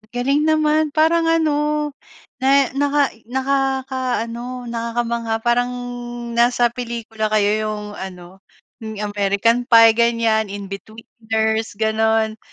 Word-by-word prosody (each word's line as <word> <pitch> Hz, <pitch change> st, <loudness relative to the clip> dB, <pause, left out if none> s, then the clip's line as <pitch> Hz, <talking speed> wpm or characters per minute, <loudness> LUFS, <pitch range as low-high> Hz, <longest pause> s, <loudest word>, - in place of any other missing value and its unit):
Galing 275 Hz, +5 st, +1 dB
naman 310 Hz, 0 st, +2 dB
parang 330 Hz, +1 st, +3 dB
ano, 300 Hz, -2 st, +1 dB, 0.5 s
na 275 Hz, 0 st, +3 dB
naka 285 Hz, +1 st, +1 dB, 0.2 s
nakakaano, 260 Hz, -2 st, -2 dB
nakakamangha. 235 Hz, 0 st, -2 dB
Parang 245 Hz, +1 st, +1 dB, 0.6 s
nasa 240 Hz, 0 st, +2 dB
pelikula 230 Hz, -3 st, -4 dB
kayo 210 Hz, -1 st, +2 dB, 0.2 s
yung 210 Hz, -1 st, -4 dB
ano, 185 Hz, 0 st, -9 dB, 0.4 s
yung 220 Hz, -2 st, -6 dB
American 205 Hz, +4 st, +1 dB
Pie 230 Hz, -2 st, +8 dB
ganyan, 230 Hz, -1 st, +1 dB
Inbetweeners 220 Hz, +2 st, -4 dB
gano'n, 220 Hz, 0 st, +1 dB
235 Hz, 95 wpm, -20 LUFS, 220-270 Hz, 0.6 s, Pie